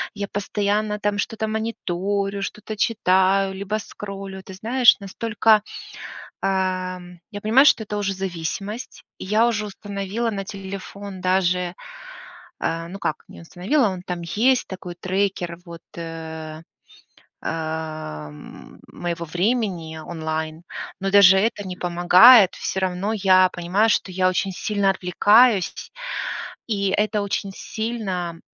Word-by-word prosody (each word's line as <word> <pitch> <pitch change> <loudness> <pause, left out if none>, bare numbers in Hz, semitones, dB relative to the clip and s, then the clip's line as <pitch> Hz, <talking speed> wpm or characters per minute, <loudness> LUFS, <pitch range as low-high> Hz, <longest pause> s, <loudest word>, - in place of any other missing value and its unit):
я 200 -1 -3
постоянно 210 +1 -1
там 205 0 0
что-то 220 +1 -2
мониторю, 200 -2 -2
что-то 210 +2 -6
читаю, 195 -2 +2
либо 200 +2 -3
скроллю, 195 -2 -8
ты 190 - -10
знаешь, 235 +4 +4
настолько, 215 +1 +2 0.8
ам 185 -2 -2
Я 205 -2 -6
понимаю, 230 +6 +5
что 230 - +5
это 210 0 -4
уже 200 -1 -1
зависимость, 195 +5 -5
и - - -7
я 215 +4 +3
уже 215 -3 -1
установила 205 +2 -3
на 195 -2 -4
телефон 195 0 -8
даже 180 -1 +1 0.9
А, 165 0 -2
ну 195 +3 -8
как - - -3
не - - -12
установила, 205 - +1
он 185 -2 -5
там 180 -1 -4
есть 240 +9 +2
такой 180 -2 -7
трекер, 185 -1 -2
вот, 170 -1 -10 0.2
э 160 -1 -7 0.8
а 155 - -4
м 75 0 -13
моего 170 -1 -4
времени 180 -2 -1
онлайн. 160 0 -4 0.4
Но 195 0 -1
даже 195 -1 +7
это 205 -1 0
не 185 - -5
помогает. 180 +5 +7
Всё 190 - -3
равно 190 +3 -1
я 185 -3 +5
понимаю, 185 +6 +1
что 190 - 0
я 185 0 +2
очень 190 +1 0
сильно 200 +1 0
отвлекаюсь 200 +3 +4
сь - - -9 0.8
и 200 -3 0
это 210 +2 +1
очень 200 0 -2
сильно 190 -7 -4
195 Hz, 130 wpm, -23 LUFS, 180-210 Hz, 0.9 s, даже